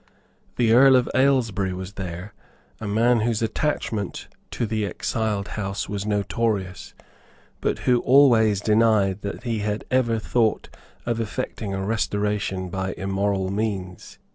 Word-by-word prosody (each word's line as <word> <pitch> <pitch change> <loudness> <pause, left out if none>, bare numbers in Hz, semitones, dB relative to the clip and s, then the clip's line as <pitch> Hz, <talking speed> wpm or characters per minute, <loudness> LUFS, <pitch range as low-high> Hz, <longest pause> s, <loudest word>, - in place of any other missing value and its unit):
The 115 -2 +3
Earl 135 +2 +7
of 125 -1 +3
Aylesbury 115 -8 +2
was 95 +1 -7
there, 90 +1 -6 0.5
a 110 - -5
man 115 +3 +3
whose 115 0 0
attachment 110 - -2 0.2
to 120 - -2
the 110 -1 -1
exiled 105 0 -2
house 100 -1 -3
was 100 0 -4
notorious, 105 -2 -2 0.6
but - - -1
who 125 -1 +4
always 115 -7 +5
denied 105 -3 +2
that 100 - -6
he 115 -3 -2
had 105 0 -3
ever 120 -3 +2
thought 110 0 0 0.3
of 115 -1 -1
effecting 110 -3 -4
a 95 0 -3
restoration 105 -3 -1
by 95 0 -3
immoral 95 0 -1
means. 100 -4 -4
105 Hz, 135 wpm, -23 LUFS, 100-115 Hz, 0.6 s, Earl